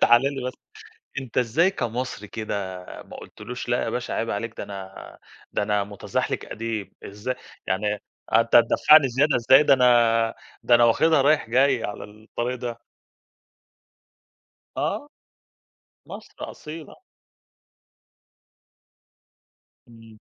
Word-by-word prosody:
تعال 120 +1 +6
لي 135 -2 -2
بس. 130 - -3 0.7
أنت، 130 -4 -4
إزاي 130 - +3
كمصري 120 - -4
كده، 95 -4 -5 0.2
ما - - -12
قُلتلوش: 120 +4 -9
"لأ 120 - +1
يا - - -2
باشا، 125 - -3
عيب 115 - -2
عليك، 110 +2 -4
ده - - -4
أنا 95 -1 -10 0.3
ده - - 0
أنا 105 -1 0
متزحلقك 100 -1 -3
قديم." 110 -2 -5
إزاي 105 +6 -5 0.3
يعني: 105 +2 0 0.4
"آه، 115 - +6
أنت 115 - -1
هتدفعني 140 +5 +6
زيادة 140 +4 +2
إزاي؟ 130 +4 +6
ده 140 - +5
أنا، 115 -3 +3 0.3
ده 120 - +4
أنا 120 0 +6
واخدها 150 +6 +4
رايح 145 -4 +2
جاي 130 -1 +3
على 105 - -5
الطريق 110 +4 -5
ده." 120 -1 -6 1.9
آه. 290 - -2 1.0
مصر - - -11 0.2
أصيلة. 155 +1 -10 2.9
امم. 115 -2 -16
115 Hz, 120 wpm, -24 LUFS, 110-130 Hz, 2.9 s, تعال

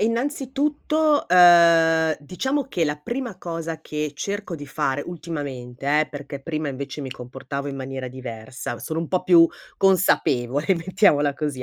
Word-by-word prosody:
innanzitutto, 290 +5 0
ehm, 170 -2 +6
diciamo 265 - -2
che 180 -11 -1
la 150 -1 -1
prima 240 - -5
cosa 165 -2 -5
che 150 -1 -4
cerco 200 +5 -4
di 145 -2 -8
fare 135 0 -1
ultimamente 145 -4 -3
eh, 155 - -1
perché 145 -1 -7
prima 155 -1 -3
invece 140 +2 -6
mi 135 - -5
comportavo 135 +3 -6
in 140 - -4
maniera 130 0 -5
diversa, 120 -1 -7
sono 160 - -4
un 165 -1 -3
po' 185 - 0
più 170 -2 +6 0.3
consapevole 145 -8 +2
mettiamola 165 -5 +2
così 145 -3 -4
160 Hz, 145 wpm, -23 LUFS, 140-185 Hz, 0.3 s, ehm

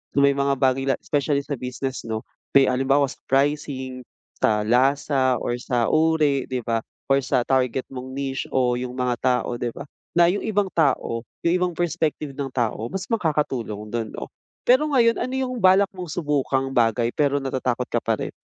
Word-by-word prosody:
So, 140 - +4
may 140 - +6
mga 140 0 +1
bagay 135 0 +1
la 135 - +3
specially 145 -1 0
sa 140 -2 -5
business 125 0 -4
'no, 110 0 -3 0.3
may 135 -1 +7
halimbawa 135 +2 +3
sa - - -13
pricing, 135 -2 0 0.4
sa 105 -1 +2
lasa, 130 +2 +2
or 120 0 -2
sa 120 -2 0
uri 155 -4 +2
'di 130 -2 -2
ba, 115 -1 0 0.3
or 135 - +5
sa 130 -1 +1
target 130 -1 +1
mong 130 0 -7
niche 135 -1 -3
o 125 -2 +2
yung 125 0 -5
mga 125 -1 0
tao, 125 -1 0
'di 120 - 0
ba? - - -7 0.3
Na 175 - +7
yung 200 - -2
ibang 205 -3 0
tao, 135 -7 +1 0.2
yung 170 - +4
ibang 180 -1 +1
perspective 160 -3 -1
ng 135 0 -4
tao 115 -3 -1
mas 190 -1 -4
makakatulong 135 - -1
du'n 115 -2 -2
'no? - - -6 0.4
Pero 260 +5 +4
ngayon 235 -5 +3
ano 255 - -2
yung 255 -2 -2
balak 190 +1 +5
mong 180 -2 -7
subukang 140 -4 0
bagay 115 -1 +2
pero 145 -1 +2
natatakot 125 -2 -1
ka 120 - +2
pa 110 -1 0
rin? - - -4
135 Hz, 185 wpm, -23 LUFS, 125-150 Hz, 0.4 s, may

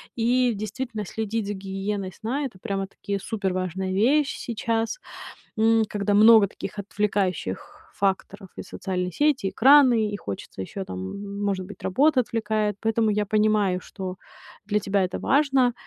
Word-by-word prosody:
И 245 +1 +2
действительно, 215 +1 -4
следить 220 +1 -3
за 205 - -2
гигиеной 195 0 -4
сна 265 +6 -3
это 195 -8 -8
прямо-таки 200 -1 -4
суперважная 185 -3 -2
вещь 270 +9 +2
сейчас, 230 - -2 0.6
м, 225 0 +4
когда 205 0 -1
много 220 0 +7
таких 200 +2 -8
отвлекающих 195 - -2 0.2
факторов: 195 0 -1
и - - -6
социальные 180 -1 -3
сети, 290 - +1
и - - 0
экраны. 250 -4 +5
И 205 - -4
хочется 100 - -7
ещё 190 - -6
там, 90 - -6
м, 200 0 -6
может 190 -2 -1
быть, 205 -1 -12
работа 265 +7 +3
отвлекает. 215 -3 -1
Поэтому 225 0 +1
я 210 0 +1
понимаю, 210 -3 +2
что 190 -2 -6 0.5
для 210 0 +1
тебя 200 -1 +1
это 185 0 -3
важно. 270 -4 +3
210 Hz, 145 wpm, -25 LUFS, 195-225 Hz, 0.6 s, много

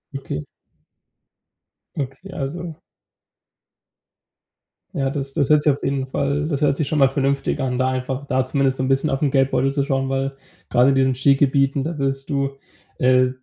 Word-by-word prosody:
Okay. 105 - -4 1.6
Okay, 140 +8 -6
also 160 +4 -5 2.2
Ja, 135 -1 0
das 135 -1 -4
das 135 - 0
hört 150 -1 +5
sich 150 - +4
auf 140 - -8
jeden 135 -1 -1
Fall 140 +2 -1
das 145 -3 -2
hört 140 -2 +2
sich 150 - -1
schon 155 - 0
mal 135 -1 +6
vernünftig 140 +1 0
an, 130 -2 -1
da 130 0 +2
einfach 130 +2 -3
da 130 -2 +1
zumindest 135 0 +1
so - - -1
'n - - 0
bisschen 135 +3 +2
auf 135 +2 -1
'n 140 - +2
Geldbeutel 135 -1 +2
zu 140 0 0
schauen, 135 -1 -1
weil, 135 0 -1 0.4
gerade 125 +2 +4
in 135 - +2
diesen 130 -1 +2
Skigebieten, 140 +1 +3
da 165 +2 -4
wirst 135 -1 -2
du, 140 -1 0 0.5
äh, 130 0 +4
135 Hz, 175 wpm, -21 LUFS, 135-140 Hz, 2.2 s, mal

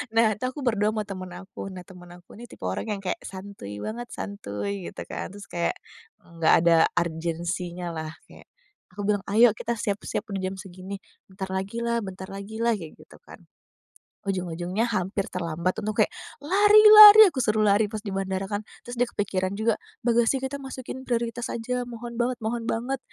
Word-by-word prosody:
Nah 225 -2 +4
itu 210 - -11
aku 290 - -9
berdua 215 -2 +2
sama 215 -1 -2
temen 185 -2 -7
aku, 190 +2 -8
nah 185 -1 -8
temen 180 -2 -13
aku 175 0 -15
ini 230 - -11
tipe - - -14
orang 95 +1 -2
yang 205 - -2
kayak 180 - -2
santuy 190 - -8
banget, 235 - -5
santuy 200 - -5
gitu - - -7
kan, - - -5
terus 200 +1 -11
kayak 170 -1 -1 0.5
enggak 165 -2 +1
ada 170 -1 +5 0.2
urgensinya 170 +1 -3
lah. 160 -1 -4 0.2
Kayak - - -16 0.4
aku 200 +3 -7
bilang, 205 -2 +1
"Ayo 230 +3 +6
kita 235 +2 -3
siap-siap 205 -1 -2
untuk 195 -1 -3
jam 190 +1 -2
segini." 190 +1 -8 0.3
"Bentar 190 0 -5
lagi 195 +5 -3
lah 235 0 0
bentar 190 -1 -7
lagi 200 +3 -7
lah," 235 -1 +3
kayak 165 -6 -10
gitu - - -16
kan. - - -13 0.8
Ujung-ujungnya 185 +2 -2
hampir 195 -2 -2
terlambat, 170 0 -2
untung 215 0 -2
kayak, 215 - +5 0.3
"Lari 410 +8 +5 0.2
lari!" 425 0 +12
aku 270 -9 -1
suruh 215 -1 +1
lari 205 +1 +3
pas 215 - -4
di 215 - -11
bandara 190 0 -2
kan. 205 +1 -3 0.2
Terus 245 - -6
dia - - +5
kepikiran 190 -2 -1
juga, 220 0 +2 0.3
"Bagasi 235 +2 +3
kita 265 +2 -4
masukin 260 0 -7
prioritas 235 0 -2
aja, 245 +2 -2
mohon 235 0 -8
banget 245 +1 0
mohon 230 +1 -3
banget, 250 +4 -2
200 Hz, 185 wpm, -26 LUFS, 185-235 Hz, 0.8 s, lari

